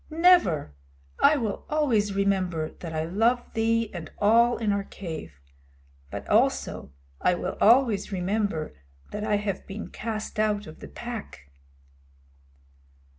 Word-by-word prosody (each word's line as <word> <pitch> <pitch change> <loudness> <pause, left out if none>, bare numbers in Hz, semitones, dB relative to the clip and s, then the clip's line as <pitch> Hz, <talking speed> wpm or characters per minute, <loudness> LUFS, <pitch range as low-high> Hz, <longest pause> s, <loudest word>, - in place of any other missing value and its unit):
"Never. 320 - +4 0.5
I 300 +1 +5
will 220 -6 -3
always 235 -10 +1
remember 185 -5 0
that 170 - -6
I 160 0 -2
love 225 +8 +1
thee 225 0 +1
and 170 -3 -7
all 235 +3 +4
in 215 -3 0
our 200 0 0
cave. 160 - -8 0.7
But - - -7
also 70 - +1 0.3
I 180 - +3
will 180 +1 -4
always 230 -3 +4
remember 190 -3 -1 0.4
that 210 - -4
I 215 -1 +1
have 205 -2 -3
been 205 +2 -6
cast 215 -1 -5
out 210 -1 +1
of 155 - -11
the - - -9
Pack." 220 - -8
205 Hz, 130 wpm, -26 LUFS, 180-230 Hz, 0.7 s, I